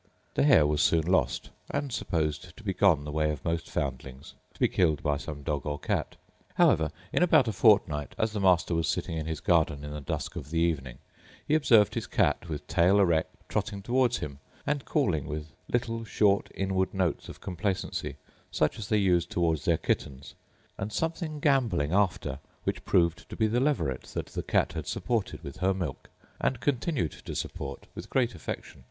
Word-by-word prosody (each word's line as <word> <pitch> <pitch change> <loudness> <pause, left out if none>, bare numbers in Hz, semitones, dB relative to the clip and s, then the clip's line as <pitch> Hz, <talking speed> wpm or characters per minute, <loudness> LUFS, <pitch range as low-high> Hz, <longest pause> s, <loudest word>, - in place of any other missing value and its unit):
The - - +1
hare 75 0 +6
was 75 0 +1
soon 80 -1 +3
lost, 95 +2 +1 0.2
and 140 -3 -2
supposed 85 +1 -2
to 115 - -13
be 95 -2 -1
gone 90 -6 +4
the 75 - -5
way 75 0 +1
of 75 -2 -4
most 85 0 -1
foundlings, 65 -1 -4 0.2
to - - -20
be - - +4
killed 80 -5 +1
by 75 -1 +1
some 75 -1 -7
dog 75 -3 -2
or 75 0 -1
cat. - - -2 0.4
However, 80 -1 +4 0.2
in - - +2
about 165 -8 +5
a - - +1
fortnight, 95 -8 +3
as 110 0 +1
the 105 - -3
master 90 -3 +3
was 80 -1 +1
sitting 80 - -1
in 80 -1 -3
his 80 -2 -3
garden 80 -4 +2
in 75 - -6
the 75 0 -5
dusk 70 - -4
of 70 - -6
the 80 - -2
evening, 75 -7 0 0.5
he - - +1
observed 115 - +5
his - - -3
cat, - - +1
with 75 -2 -5
tail 90 +4 +4
erect, 85 -5 +2
trotting 100 -1 -2
towards 125 +1 +2
him, 70 -2 -6 0.3
and 145 -2 -1
calling 90 - +1
with 75 +1 -5 0.2
little 115 -1 -1
short 100 -2 +2
inward 95 0 0
notes 90 -4 -1
of - - -9
complacency, 95 +1 -3 0.3
such 75 - 0
as 100 - -6
they 110 - +3
use 90 -4 +3
towards 80 -5 0
their - - +3
kittens, 70 0 -3 0.5
and 105 +2 -3
something 165 - -2
gamboling 115 - +2
after, 95 -9 +1 0.2
which - - -3
proved 85 -1 +2
to - - -7
be 110 - +2
the 115 +3 +1
leveret 85 - 0
that - - -2
the - - -5
cat - - +1
had - - -5
supported 115 -5 -2
with 70 +6 -8
her 95 +1 +1
milk, 85 -7 -5 0.3
and 130 - 0
continued 135 - 0
to - - -8
support - - -5
with - - -8
great 125 -3 +1
affection. 85 - -7
90 Hz, 195 wpm, -28 LUFS, 75-110 Hz, 0.5 s, hare